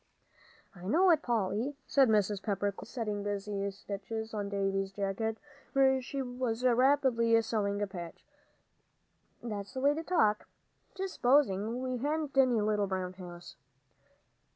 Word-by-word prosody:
"I 180 0 -10
know 355 - +5
it, 315 -3 +3
Polly," 235 +4 -1
said 270 -3 +4
Mrs. 210 -2 +2
Pepper, 205 -1 -1
quickly, 195 - -11
setting 210 -4 -3
busy 200 0 -2
stitches 205 +3 -6
on 205 -2 -3
Davie's 195 -1 -1
jacket, 200 +3 -2 0.4
where 265 -1 +4
she 270 +2 -4
was 245 -2 -3
rapidly 250 -2 +4
sewing 205 -2 -1
a - - +2
patch, 175 -4 -9 1.2
"that's 210 +1 -5
the - - -2
way 285 +2 +4
to 315 - -3
talk. 215 -13 +2 0.5
Just 385 -1 -4
supposing 245 -3 +2
we 255 -1 -2
hadn't 295 +2 -2
any 255 -4 +4
little 210 -1 +1
brown 185 -1 -3
house." 175 -4 -10
220 Hz, 140 wpm, -31 LUFS, 200-260 Hz, 1.2 s, know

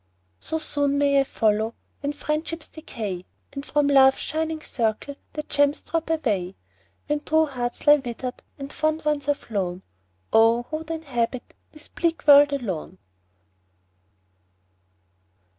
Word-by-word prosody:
So 320 - -3
soon 285 -2 0
may 280 -1 +4
I - - +2
follow, 220 -3 0 0.2
When 285 0 -2
friendships 305 +2 -3
decay, 210 - -6 0.3
And 275 0 -5
from 295 0 +1
Love's 270 -1 +6
shining 320 0 -2
circle 230 +4 -1 0.2
The 305 - -4
gems 285 0 +1
drop 330 0 -2
away. 210 - -1 0.5
When 295 0 0
true 315 +1 +2
hearts 245 -4 -4
lie 295 0 +8
wither'd, 250 -1 -6 0.2
And 275 0 -7
fond 310 0 -1
ones 295 -2 0
are 290 - +4
flown, 190 -8 -4 0.5
Oh! 225 +2 +5
who 310 - -1
would 320 +1 -10
inhabit 255 -7 -3 0.2
This 305 -1 -11
bleak 335 -1 -2
world 290 -1 +8
alone 190 - -4
285 Hz, 135 wpm, -24 LUFS, 235-305 Hz, 0.5 s, lie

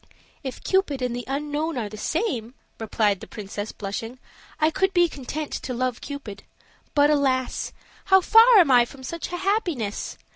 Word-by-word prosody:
"If 265 -3 -7
Cupid 310 -9 +1
and 245 -1 -1
the 245 - -5
unknown 295 +3 -2
are 225 -4 -2
the 210 - -9
same," 250 - -2 0.2
replied 210 -3 +1
the 220 - -10
princess, 205 0 -6
blushing, 225 +4 -6 0.4
"I 310 0 +3
could 385 +3 0
be 350 0 +5
content 295 0 -6
to 255 - -4
love 250 -1 -2
Cupid; 235 -9 -7 0.5
but 290 0 +5
alas! 265 -3 0 0.3
how 385 -1 +6
far 450 +5 +7
am 340 -8 +6
I 245 -1 +7
from 260 +2 -10
such 335 +7 -5
a 355 - -3
happiness! 350 - -2
275 Hz, 170 wpm, -24 LUFS, 235-335 Hz, 0.5 s, far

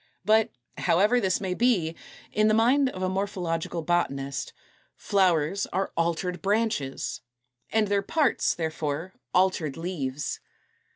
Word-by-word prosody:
But, 220 +1 +4 0.3
however 210 +8 +3
this 190 -3 +1
may 190 -2 -2
be, 180 -8 +2 0.4
in 215 0 +3
the 215 - +4
mind 260 +5 +4
of 185 -6 -6
a - - +2
morphological 180 -4 -2
botanist, 140 -5 -1 0.5
243. - - -17
=Flowers 185 -2 +3
are 190 +2 -1
altered 170 +1 -1
Branches=, 200 -10 -1 0.5
and 220 -1 +2
their 200 0 +2
parts, 285 +6 +1
therefore, 160 +1 -3 0.2
altered 180 -6 +1
leaves. 150 -6 -3
185 Hz, 125 wpm, -27 LUFS, 160-210 Hz, 0.5 s, But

